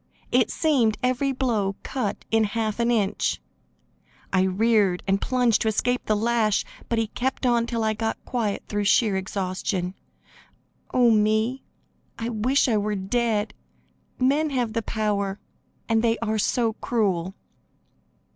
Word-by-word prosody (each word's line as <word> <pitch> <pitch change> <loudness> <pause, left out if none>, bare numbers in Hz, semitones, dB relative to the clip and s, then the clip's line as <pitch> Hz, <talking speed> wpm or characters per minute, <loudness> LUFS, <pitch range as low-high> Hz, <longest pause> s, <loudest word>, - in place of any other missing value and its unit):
It - - +3
seemed 255 -9 +2
every 255 +2 +1
blow 225 -7 0
cut 250 -7 -3
in 225 0 +4
half 215 +1 -2
an 235 0 +2
inch. 210 -5 0 0.9
I 190 - +4
reared 195 -1 +2
and 195 0 +1
plunged 245 -3 +2
to - - 0
escape 245 +3 0
the 215 - +3
lash, 220 -1 +1 0.2
but 230 - 0
he 225 - +2
kept 260 +5 -3
on 235 -1 +2
till 230 -2 -2
I 220 0 +1
got 220 +1 -2
quiet 225 -5 -2
through 205 -1 -2
sheer 210 0 +3
exhaustion. 185 -1 -2 1.0
Oh, 245 -2 +4
me! 220 +4 +2 0.6
I 230 +1 -3
wish 245 +6 +2
I 225 -3 +2
were 210 0 -1
dead; 210 +1 0 0.6
men 285 +4 +2
have 245 -5 -1
the 230 - 0
power, 205 -3 -1 0.5
and 225 -1 +2
they 230 -1 +2
are 220 -1 -1
so 225 +2 +1
cruel." 190 -6 -1
220 Hz, 145 wpm, -24 LUFS, 205-240 Hz, 1.0 s, in